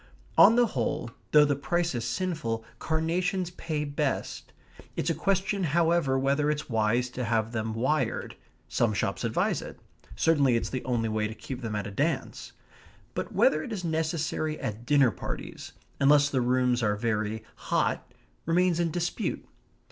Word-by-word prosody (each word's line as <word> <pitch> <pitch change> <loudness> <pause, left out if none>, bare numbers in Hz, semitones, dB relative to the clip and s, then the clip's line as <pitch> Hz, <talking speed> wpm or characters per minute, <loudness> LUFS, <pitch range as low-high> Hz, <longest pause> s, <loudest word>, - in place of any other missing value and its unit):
On 230 - +8
the 245 0 +5
whole, 120 - -2 0.2
though 150 -1 +7
the 145 -1 +1
price 175 +4 0
is 120 -1 -2
sinful, 145 -9 -2
carnations 175 +3 0
pay 155 -4 -3
best; 145 -1 -2 0.4
it's 165 - 0
a - - +1
question, 195 +4 0
however, 165 -3 +2
whether 140 +2 +1
it's 150 0 -2
wise 115 +2 +1
to 125 - -4
have 115 -1 0
them 110 -1 -2
wired. 130 +7 0 0.3
Some 110 -3 +1
shops - - -1
advise - - 0
it. - - -9 0.4
Certainly 145 -6 +3
it's 115 - -1
the 130 - -3
only 120 -3 0
way 110 -1 0
to 110 - -7
keep 130 +1 -7
them 110 -3 -3
at 105 - -2
a 105 - -5
dance; 100 - -2 0.6
but - - -4
whether 155 - +3
it 195 - -7
is 200 -4 -4
necessary 160 -1 -1
at 120 -2 -5
dinner 140 -5 +5
parties, 90 - -7 0.3
unless 145 +1 +5
the 130 - +1
rooms 125 0 +2
are 105 -2 +2
very 110 0 -1
hot, - - -1 0.4
remains 175 0 +3
in 170 -1 +1
dispute. 175 +6 -2
140 Hz, 165 wpm, -28 LUFS, 115-165 Hz, 0.6 s, On